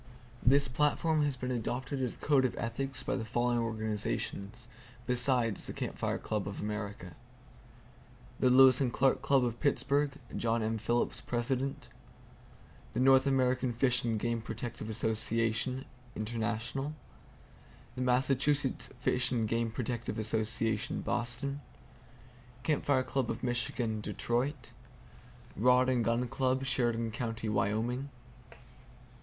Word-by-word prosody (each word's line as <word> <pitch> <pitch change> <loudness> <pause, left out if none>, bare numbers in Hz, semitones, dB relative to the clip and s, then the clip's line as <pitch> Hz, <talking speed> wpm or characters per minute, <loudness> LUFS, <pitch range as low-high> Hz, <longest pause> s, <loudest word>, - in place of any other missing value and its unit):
This 140 +3 +4
platform 150 +4 +1
has 140 -3 -1
been 125 +1 -3
adopted 125 +3 -2
as 125 -3 -1
a - - -16
code 140 -3 +3
of 130 - 0
ethics 135 +4 -3
by - - -1
the 115 - -2
following 120 +2 +1
organizations, 110 0 -3 0.4
besides 125 -3 +1
the - - -5
Camp - - -4
Fire - - -1
Club 105 -2 -3
of 100 - -5
America: 105 -5 -5 1.2
The 130 - +4
Lewis 130 0 +7
and 125 -3 +1
Clark 135 +1 +2
Club, 135 -3 +3
of 120 -1 -3
Pittsburgh, 140 0 +1 0.2
John 115 -1 0
M. 110 0 -1
Phillips, 120 +3 0
President. 130 +3 -2 1.1
The - - 0
North 135 +1 +5
American 130 -2 +2
Fish 125 +1 +2
and 115 -2 0
Game 115 +1 -1
Protective 110 0 -6
Association 115 +3 0 0.3
(International) 115 +6 -2 1.0
Massachusetts 130 +2 +1
Fish 125 0 +1
and 115 -3 +1
Game 115 +1 0
Protective 120 -1 -3
Association, 110 0 0
Boston. 125 +4 -2 1.0
Camp 155 -3 +1
Fire 130 -2 +3
Club 130 -2 -1
of 115 +2 -4
Michigan, 120 -2 -1
Detroit. 125 +4 -2 0.8
Rod 125 +4 +4
and 125 -2 +2
Gun 115 +2 +1
Club, 130 +2 0
Sheridan 120 -4 +1
County, 115 -1 -3
Wyoming. 110 +6 0
120 Hz, 125 wpm, -32 LUFS, 115-130 Hz, 1.2 s, Lewis